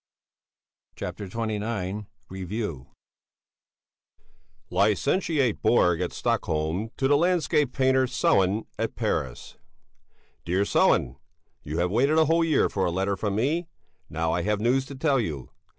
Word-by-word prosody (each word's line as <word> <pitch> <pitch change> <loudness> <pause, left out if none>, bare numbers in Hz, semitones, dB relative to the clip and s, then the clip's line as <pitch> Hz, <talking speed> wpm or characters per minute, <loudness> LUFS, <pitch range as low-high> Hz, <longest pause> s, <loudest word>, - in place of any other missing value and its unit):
CHAPTER 100 - -6
XXIX 105 -2 -3 0.2
REVUE 95 - -5 1.8
LICENTIATE 125 - +1
BORG 90 -7 +3
at 90 - -2
STOCKHOLM 80 +7 -1
to 135 - +1
the 145 - +4
LANDSCAPE 160 -4 +2
PAINTER 130 0 +2
SELLÉN 105 -4 +2
at - - -2
PARIS - - -3 0.9
DEAR 90 +4 +1
SELLÉN, 65 -9 +2 0.4
You 75 +2 -5
have 90 +1 0
waited 135 +8 +2
a 160 - +5
whole 165 +2 +3
year 160 -3 +3
for 95 - -2
a - - +1
letter 95 +3 0
from 100 +1 -2
me; 155 +10 0 0.4
now 80 +1 -1
I 85 - 0
have 105 +2 0
news 130 +4 +1
to 140 - -8
tell 135 0 +1
you. 75 - -4
105 Hz, 130 wpm, -26 LUFS, 90-135 Hz, 1.8 s, a